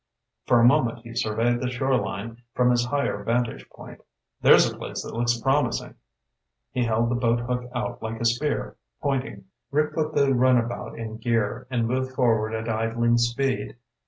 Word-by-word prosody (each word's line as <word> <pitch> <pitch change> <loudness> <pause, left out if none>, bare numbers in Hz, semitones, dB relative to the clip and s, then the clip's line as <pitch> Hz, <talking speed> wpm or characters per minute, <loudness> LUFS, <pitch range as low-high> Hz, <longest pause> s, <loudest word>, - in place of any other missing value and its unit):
For 120 - +5
a 115 - +5
moment 120 -3 +3
he 115 -1 -10
surveyed 115 +1 0
the 125 - -1
shoreline 120 -3 -2
from 125 0 +4
his 120 0 +2
higher 140 -6 -1
vantage 120 +1 -1
point. - - -12 0.4
"There's - - +7
a - - -5
place - - -6
that - - -8
looks 120 0 0
promising." 135 +4 0 0.8
He 125 -1 0
held 115 +1 +1
the - - +1
boat 120 -1 +1
hook 125 0 -3
out 120 0 -3
like 110 0 -5
a 115 - -2
spear, 120 +6 0 0.2
pointing. 135 - -2 0.2
Rick 150 +2 0
put 155 -1 -2
the 140 -1 +3
runabout 120 -1 +1
in 110 -1 -6
gear, 115 +1 -1
and 120 -3 0
moved 130 +2 -2
forward 115 -4 +2
at 110 +1 -4
idling 115 +1 +1
speed. 120 +3 -1
120 Hz, 170 wpm, -25 LUFS, 115-130 Hz, 0.8 s, There's